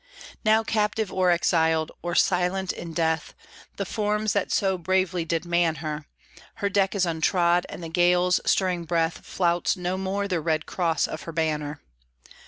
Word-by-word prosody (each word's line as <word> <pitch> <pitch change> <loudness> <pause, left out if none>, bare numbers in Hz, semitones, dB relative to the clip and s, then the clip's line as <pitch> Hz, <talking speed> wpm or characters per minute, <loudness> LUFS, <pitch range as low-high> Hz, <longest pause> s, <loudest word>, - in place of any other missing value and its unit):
Now 220 0 +4
captive 215 -1 -1
or 185 -1 +2
exiled, 160 -2 +2
or 175 +1 -3
silent 180 +1 +2
in 170 - -7
death, 160 -1 -1 0.4
The 200 - -3
forms 210 +1 -1
that 200 - -1
so 190 -1 +2
bravely 185 0 0
did 165 0 -1
man 170 -2 +2
her; 150 -1 -5 0.5
Her 200 -2 -1
deck 195 0 +1
is 190 -2 +2
untrod, 170 +1 +2
and 175 - -8
the - - -4
gale's 180 +2 +3
stirring 180 -3 +1
breath 165 0 -1
Flouts 175 -1 0
no 180 +1 -2
more 195 +1 -2
the 180 -4 -1
red 155 -1 0
cross 165 -3 0
of 155 - -6
her - - -3
banner! 150 -2 -2
175 Hz, 165 wpm, -25 LUFS, 165-190 Hz, 0.5 s, Now